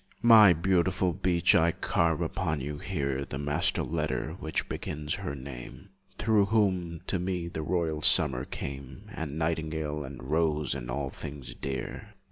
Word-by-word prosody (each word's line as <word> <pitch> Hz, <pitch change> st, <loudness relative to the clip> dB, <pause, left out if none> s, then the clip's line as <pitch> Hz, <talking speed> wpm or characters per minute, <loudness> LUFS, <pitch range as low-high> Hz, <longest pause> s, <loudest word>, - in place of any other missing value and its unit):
My 110 Hz, -4 st, +9 dB
beautiful 90 Hz, +1 st, +2 dB
beech, 90 Hz, -2 st, +2 dB
I 85 Hz, 0 st, +4 dB
carve 85 Hz, 0 st, +1 dB
upon 80 Hz, -1 st, -1 dB
you 75 Hz, +2 st, -5 dB
here 70 Hz, -7 st, -2 dB
The 70 Hz, -, -6 dB
master 75 Hz, +1 st, +1 dB
letter 80 Hz, 0 st, -2 dB
which 80 Hz, 0 st, -2 dB
begins 75 Hz, 0 st, -4 dB
her 70 Hz, -, -3 dB
name 65 Hz, +7 st, -9 dB, 0.3 s
Through 110 Hz, -3 st, +3 dB
whom, 95 Hz, -6 st, +1 dB
to 95 Hz, -, -1 dB
me, 90 Hz, -1 st, -2 dB
the 80 Hz, -2 st, -4 dB
royal 80 Hz, -2 st, -1 dB
summer 65 Hz, -3 st, +3 dB
came, 70 Hz, -2 st, -7 dB
And 75 Hz, -2 st, -4 dB
nightingale 80 Hz, -2 st, -2 dB
and 65 Hz, -2 st, -9 dB
rose, 75 Hz, +1 st, +1 dB
and -, -, -6 dB
all 65 Hz, +2 st, -2 dB
things 70 Hz, -2 st, -7 dB
dear. 70 Hz, -, -5 dB
80 Hz, 150 wpm, -29 LUFS, 70-90 Hz, 0.3 s, My